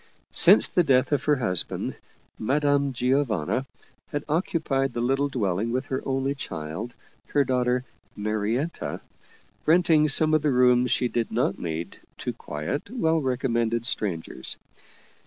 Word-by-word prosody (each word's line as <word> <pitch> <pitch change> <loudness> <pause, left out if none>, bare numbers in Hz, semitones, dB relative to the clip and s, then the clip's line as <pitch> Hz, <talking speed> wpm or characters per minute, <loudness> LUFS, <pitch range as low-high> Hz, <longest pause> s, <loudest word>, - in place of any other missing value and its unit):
Since - - +7
the 180 - +3
death 130 -3 +2
of 145 -2 0
her 150 - +4
husband, 95 -10 -1 0.4
Madame 140 +3 +1
Gio 130 +3 +1
vanna 115 - -2 0.4
had 145 -1 -4
occupied 150 -5 0
the 120 - -3
little 135 +4 +1
dwelling 105 -3 -1
with 130 +3 -1
her 130 0 -3
only 135 +1 0
child, 100 - -6 0.3
her 145 - +2
daughter 125 -1 0 0.3
Marietta, 110 +9 -2 0.7
renting 160 -2 +4
some 155 +2 +6
of 155 - +4
the 150 - +1
rooms 125 -1 +4
she 125 - +1
did 120 -1 -2
not 115 -3 0
need 85 -1 -5 0.2
to - - -4
quiet, 75 - -5
well 165 -10 +1
recommended 120 -3 0
strangers. 90 - -3
130 Hz, 140 wpm, -25 LUFS, 115-145 Hz, 0.7 s, Since